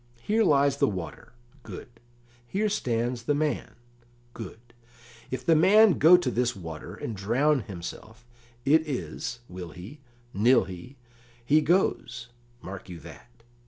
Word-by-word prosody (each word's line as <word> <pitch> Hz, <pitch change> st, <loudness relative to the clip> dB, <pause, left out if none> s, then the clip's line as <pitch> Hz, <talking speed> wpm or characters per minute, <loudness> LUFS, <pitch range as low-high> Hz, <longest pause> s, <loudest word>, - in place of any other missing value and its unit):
"Here 220 Hz, -, +2 dB
lies 140 Hz, -5 st, +3 dB
the -, -, +3 dB
water 90 Hz, -, -6 dB, 0.3 s
good; -, -, -9 dB, 0.6 s
here 210 Hz, -, 0 dB
stands 120 Hz, -, -1 dB
the 145 Hz, -, +2 dB
man 145 Hz, -6 st, -2 dB, 0.6 s
good; 115 Hz, +1 st, -10 dB, 0.6 s
if 130 Hz, 0 st, -5 dB
the 165 Hz, -, +5 dB
man 195 Hz, +3 st, +6 dB
go 170 Hz, +4 st, +8 dB
to 175 Hz, -, -1 dB
this 125 Hz, 0 st, 0 dB
water 80 Hz, -5 st, -8 dB
and 115 Hz, -, -5 dB
drown 130 Hz, +9 st, +2 dB
himself, 110 Hz, +3 st, -9 dB, 0.4 s
it 155 Hz, +3 st, +4 dB
is, 125 Hz, -3 st, -4 dB
will 90 Hz, -1 st, -8 dB
he, 95 Hz, -, -11 dB, 0.3 s
nill 120 Hz, +5 st, +4 dB
he, 95 Hz, +9 st, -10 dB, 0.5 s
he 150 Hz, +5 st, +4 dB
goes 150 Hz, -7 st, 0 dB, 0.3 s
mark 95 Hz, 0 st, -8 dB
you 85 Hz, -2 st, -8 dB
that. 120 Hz, -, -14 dB
125 Hz, 135 wpm, -27 LUFS, 105-150 Hz, 0.6 s, go